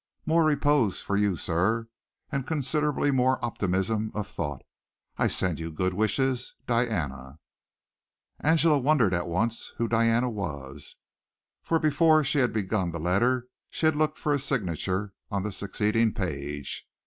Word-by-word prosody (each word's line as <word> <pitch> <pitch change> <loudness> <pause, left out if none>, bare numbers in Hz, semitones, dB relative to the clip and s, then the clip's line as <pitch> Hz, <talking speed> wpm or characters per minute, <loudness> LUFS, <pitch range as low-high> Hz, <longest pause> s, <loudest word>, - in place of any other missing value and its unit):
More 165 +1 +3
repose 145 -8 +2
for 100 - -2
you, 100 -2 +2
sir, 105 +9 0 0.4
and 140 -3 -2
considerably 150 -1 0
more 130 0 +3
optimism 105 0 -1
of 105 -1 -3
thought. 75 -9 -5 0.5
I - - +2
send 90 -4 +1
you 80 0 -4
good 90 +4 -1
wishes. 125 +5 0
Diana." 80 - -1 1.0
Angela 160 -1 +4
wondered 130 -8 +3
at 85 0 -1
once 110 +7 -1
who 115 - 0
Diana 115 +2 +2
was, 75 - -5 0.7
for 165 - +1
before 155 0 +4
she 140 +1 +1
had 125 -2 +2
begun 100 -3 -1
the 85 0 -5
letter 120 +10 +1 0.2
she - - -2
had 155 -1 +4
looked 155 0 0
for 150 - 0
the 140 - +1
signature 100 - -2 0.2
on 100 -2 -2
the 105 - -3
succeeding 105 +3 0
page. 75 -6 -4
110 Hz, 145 wpm, -27 LUFS, 90-135 Hz, 1.0 s, Angela